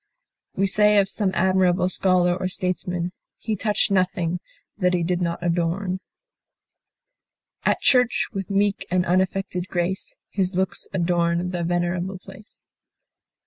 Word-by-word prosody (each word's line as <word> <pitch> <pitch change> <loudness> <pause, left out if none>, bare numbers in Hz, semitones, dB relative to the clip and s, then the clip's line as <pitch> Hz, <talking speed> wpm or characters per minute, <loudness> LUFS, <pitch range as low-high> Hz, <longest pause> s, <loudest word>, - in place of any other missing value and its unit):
We 195 - +2
say 210 +1 +4
of 200 -1 +4
some 200 0 0
admirable 185 -1 +3
scholar 185 -1 +2
or 185 0 -2
statesman, 180 -1 -2 0.3
"he 220 - -3
touched 210 0 0
nothing 180 -2 +1 0.4
that 180 -2 +2
he 175 - 0
did 175 +1 -1
not 170 0 -2
adorn." 175 +2 -1 1.7
At - - +2
church, 250 -3 +3
with 195 -1 -4
meek 200 0 0
and 180 0 +1
unaffected 185 0 0
grace, 180 +1 -2 0.2
His 190 -2 -1
looks 190 +1 -1
adorned 175 -1 0
the 175 -1 -3
venerable 175 +2 -1
place. 195 +3 -14
185 Hz, 130 wpm, -23 LUFS, 175-195 Hz, 1.7 s, say